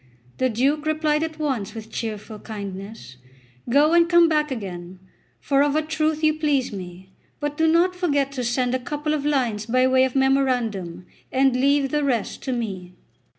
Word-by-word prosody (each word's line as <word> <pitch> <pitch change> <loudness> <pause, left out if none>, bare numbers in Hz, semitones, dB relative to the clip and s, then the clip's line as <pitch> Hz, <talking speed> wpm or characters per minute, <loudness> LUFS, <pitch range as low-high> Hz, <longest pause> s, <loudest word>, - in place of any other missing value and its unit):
The 255 - +2
Duke 280 +7 0
replied 310 -1 +1
at 320 -1 -3
once 255 -10 -2
with 220 0 -9
cheerful 215 -1 -5
kindness: 200 - -8 0.5
"Go 290 +6 +4
and 340 0 +4
come 345 -1 +6
back 300 -1 +1
again, 185 -7 -6 0.4
for 275 -1 +1
of 290 0 +2
a 310 - +2
truth 310 0 -1
you 310 0 +4
please 295 -6 0
me; 185 0 -9 0.3
but 295 0 -3
do 320 +1 +2
not 345 +3 +3
forget 285 -6 0
to 260 -2 -4
send 245 +1 0
a 255 - 0
couple 295 +4 -3
of 295 -1 -1
lines 235 -7 0
by 255 +2 +3
way 260 0 +4
of 260 0 -1
memorandum, 245 -10 0 0.3
and 265 -1 +3
leave 275 +1 +2
the 300 -1 0
rest 245 -6 -1
to 265 - -1
me." 190 -7 -4
265 Hz, 180 wpm, -23 LUFS, 220-300 Hz, 0.5 s, come